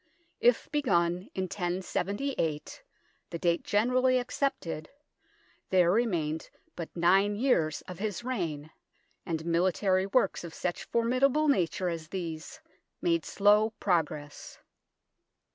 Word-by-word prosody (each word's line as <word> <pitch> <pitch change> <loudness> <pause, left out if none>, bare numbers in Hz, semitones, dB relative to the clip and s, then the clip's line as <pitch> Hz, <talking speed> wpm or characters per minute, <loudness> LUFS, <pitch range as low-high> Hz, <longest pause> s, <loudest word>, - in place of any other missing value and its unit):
If 240 0 +3
begun 180 - +1
in 190 - -1
1078, 185 - -2 0.5
the 170 - -4
date 170 0 +1
generally 255 +4 +2
accepted, 250 - -2 0.8
there 180 -2 +4
remained 170 -8 0 0.3
but 170 - -5
nine 195 +4 +4
years 205 - +1
of 180 -2 -9
his 210 +1 -3
reign, 165 - -3 0.6
and 160 -2 -2
military 185 +3 +2
works 240 -1 +1
of 165 -2 -8
such 175 -1 -4
formid 235 +2 +1
able 295 +3 +4
nature 185 - +1
as 165 -2 -4
these 165 - -6 0.4
made 335 -1 +1
slow 210 +2 +3
progress. 155 -5 -2
185 Hz, 110 wpm, -29 LUFS, 170-235 Hz, 0.8 s, there